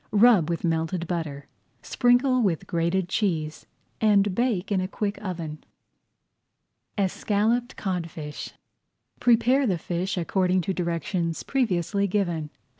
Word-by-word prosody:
Rub 210 Hz, -6 st, +5 dB
with 170 Hz, -, -2 dB
melted 165 Hz, +1 st, -1 dB
butter, 160 Hz, -5 st, -4 dB, 0.4 s
sprinkle 250 Hz, +1 st, +3 dB
with 185 Hz, -8 st, 0 dB
grated 170 Hz, +2 st, 0 dB
cheese, 165 Hz, -6 st, -1 dB, 0.3 s
and 205 Hz, -2 st, +4 dB
bake 215 Hz, -3 st, 0 dB
in 190 Hz, -2 st, +2 dB
a 185 Hz, -, -2 dB
quick 205 Hz, +2 st, -3 dB
oven. 165 Hz, -5 st, -5 dB, 1.3 s
ESCALLOPED 210 Hz, +5 st, 0 dB
CODFISH 165 Hz, -6 st, -4 dB, 0.7 s
Prepare 245 Hz, +3 st, +4 dB
the 185 Hz, -4 st, +1 dB
fish 175 Hz, +3 st, -3 dB
according 185 Hz, +1 st, +1 dB
to 190 Hz, +3 st, -2 dB
directions 170 Hz, -1 st, -2 dB
previously 200 Hz, -, 0 dB
given. 175 Hz, -6 st, -1 dB
185 Hz, 115 wpm, -25 LUFS, 170-210 Hz, 1.3 s, Rub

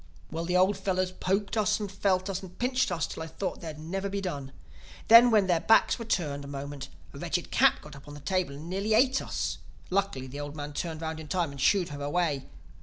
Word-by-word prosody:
"Well, 165 Hz, +1 st, -3 dB
the 180 Hz, +1 st, +2 dB
old 190 Hz, +2 st, +4 dB
fellows 185 Hz, -1 st, 0 dB
poked 195 Hz, +3 st, -1 dB
us 215 Hz, -1 st, +2 dB
and 205 Hz, -2 st, -4 dB
felt 190 Hz, -1 st, +1 dB
us 195 Hz, -1 st, -3 dB
and 185 Hz, -1 st, -11 dB
pinched 255 Hz, -3 st, +1 dB
us 165 Hz, -4 st, 0 dB
till -, -, -7 dB
I 160 Hz, -, -4 dB
thought 165 Hz, +4 st, -4 dB
they'd 160 Hz, -3 st, -6 dB
never 190 Hz, +6 st, -3 dB
be 200 Hz, +1 st, -2 dB
done. 145 Hz, -8 st, -4 dB, 0.6 s
Then, 230 Hz, +2 st, +10 dB
when 215 Hz, -4 st, +4 dB
their 175 Hz, -3 st, +2 dB
backs 225 Hz, +6 st, +4 dB
were 230 Hz, -, -5 dB
turned 150 Hz, -10 st, -1 dB
a -, -, -8 dB
moment, 140 Hz, 0 st, -6 dB, 0.2 s
a -, -, -9 dB
wretched -, -, -2 dB
cat -, -, +5 dB
got 150 Hz, -1 st, -11 dB
up 140 Hz, +1 st, -14 dB
on 145 Hz, -, -9 dB
the -, -, -9 dB
table 175 Hz, -1 st, -1 dB
and 150 Hz, +4 st, -9 dB
nearly 200 Hz, +4 st, 0 dB
ate 260 Hz, +3 st, +4 dB
us. -, -, -3 dB, 0.3 s
Luckily 195 Hz, -9 st, 0 dB
the 135 Hz, +2 st, -8 dB
old 145 Hz, 0 st, -6 dB
men 145 Hz, -1 st, -6 dB
turned 160 Hz, +1 st, -4 dB
round 160 Hz, 0 st, -3 dB
in 160 Hz, -, -8 dB
time 175 Hz, -3 st, 0 dB
and 140 Hz, -1 st, -8 dB
shooed 185 Hz, +3 st, +3 dB
her 145 Hz, -1 st, -7 dB
away. 145 Hz, -1 st, -1 dB
180 Hz, 240 wpm, -28 LUFS, 145-200 Hz, 0.6 s, Then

